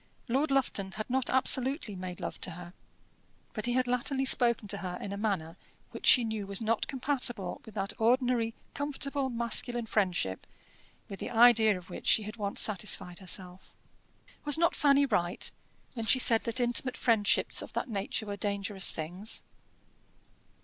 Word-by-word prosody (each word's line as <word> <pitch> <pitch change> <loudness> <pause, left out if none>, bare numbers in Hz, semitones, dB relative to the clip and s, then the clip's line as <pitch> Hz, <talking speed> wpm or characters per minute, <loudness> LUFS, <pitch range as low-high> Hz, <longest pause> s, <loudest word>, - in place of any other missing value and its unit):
Lord 270 +5 0
Lufton 210 -8 -1
had 215 - -6
not 260 -1 0
absolutely 260 - +3
made 180 -1 -7
love - - -6
to - - -1
her, 175 0 -11 0.8
but 215 0 -2
he 240 - 0
had 255 0 +1
latterly 250 +2 -1
spoken 235 -4 +3
to 200 - -1
her 180 -1 -5
in 200 - -6
a - - -4
manner 190 -6 -3 0.3
which - - -4
she 245 - +7
knew 220 -3 -4
was 200 -1 +1
not 225 0 -1
compatible 250 -8 -2
with 220 - -13
that 195 -1 -3
ordinary 235 -1 +1 0.2
comfortable 280 -1 -2
masculine 235 0 +1
friendship 180 - -1 0.6
with 195 - -9
the - - -5
idea 225 -3 +5
of 180 0 -13
which - - -8
she 220 - +4
had 215 +3 -8
once 200 -2 -3
satisfied 195 -3 0
herself. 185 -1 -2 0.7
Was 295 -1 +4
not 335 +1 +2
Fanny 280 -1 +4
right 175 -8 -1 0.4
when 230 -3 -5
she 260 - +5
said 230 -3 +3
that 230 +1 0
intimate 245 +1 +2
friendships 220 -4 +2
of - - -10
that - - -3
nature 215 0 -4
were 205 -1 -5
dangerous 200 -1 0
things? 180 +7 -5
225 Hz, 165 wpm, -29 LUFS, 195-250 Hz, 0.8 s, she